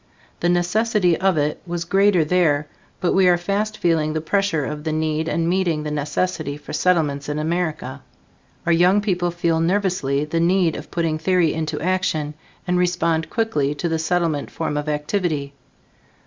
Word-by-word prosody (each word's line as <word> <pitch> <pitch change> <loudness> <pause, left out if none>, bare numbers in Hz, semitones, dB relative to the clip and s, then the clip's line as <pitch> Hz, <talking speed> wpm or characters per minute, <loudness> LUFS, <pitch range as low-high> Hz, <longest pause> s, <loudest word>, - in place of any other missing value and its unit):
The 175 - +1
necessity 180 +1 +2
of 190 0 +1
it 150 0 0
was 170 0 -3
greater 195 -2 +3
there, 155 -3 +2 0.3
but 180 - +1
we 190 -1 +4
are 175 -1 +5
fast 205 +4 -2
feeling 160 -3 +1
the 155 - -1
pressure 165 -2 0
of 150 +1 -5
the 160 - -2
need 155 0 -1
and 165 0 0
meeting 175 -4 0
the 150 - -4
necessity 150 0 -2
for - - -10
Settlements 150 -6 +1
in 150 - -2
America. 155 -4 -2 0.6
Our 170 - +2
young 180 +4 +4
people 180 -4 0
feel 170 -1 0
nervously 165 -6 0
the 165 +2 -1
need 175 -1 +2
of - - -8
putting 165 -2 -1
theory 175 -1 +2
into 155 -1 -3
action, 160 -3 -1 0.3
and 180 -1 +1
respond 170 -3 0
quickly 150 -11 0
to 170 - -2
the 165 -1 -1
Settlement 160 -2 0
form 160 -2 -3
of 150 +1 -2
activity. 150 -2 -2
165 Hz, 170 wpm, -21 LUFS, 150-180 Hz, 0.6 s, are